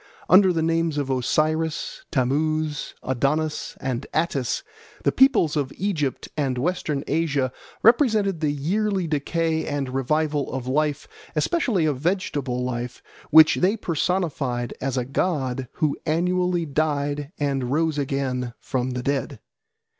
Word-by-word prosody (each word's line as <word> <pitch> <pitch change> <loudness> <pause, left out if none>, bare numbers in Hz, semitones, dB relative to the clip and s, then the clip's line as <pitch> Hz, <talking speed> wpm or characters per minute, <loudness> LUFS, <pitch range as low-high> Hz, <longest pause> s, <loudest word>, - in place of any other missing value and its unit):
Under 190 0 +7
the 165 -2 0
names 165 -1 +1
of 140 -2 -1
Osiris, 155 +5 0
Tammuz, 150 +3 0
Adonis, 145 +4 -1
and 130 0 -3
Attis, 150 - 0 0.4
the - - +3
peoples 265 - +4
of 140 -3 -1
Egypt 160 -9 -1
and 135 -4 -1
Western 150 -1 -1
Asia 145 -4 0 0.3
represented 220 - +4
the 155 -2 +1
yearly 190 +7 0
decay 160 +1 0
and 145 -3 -2
revival 145 +3 0
of 130 -2 -3
life, 150 +2 0 0.3
especially 245 - +1
of 145 -4 0
vegetable 145 -7 -1
life, 120 -1 -4 0.3
which 155 0 +7
they 195 +5 +2
personified 155 - -1
as 135 -1 -1
a 125 - 0
god 135 -3 -1
who 150 -2 0
annually 180 +1 +1
died 145 -1 -1
and 135 -4 -1
rose 155 0 +1
again 130 -3 -2
from 130 -1 -2
the 125 - -3
dead. 140 0 -1
150 Hz, 130 wpm, -24 LUFS, 135-165 Hz, 0.4 s, Under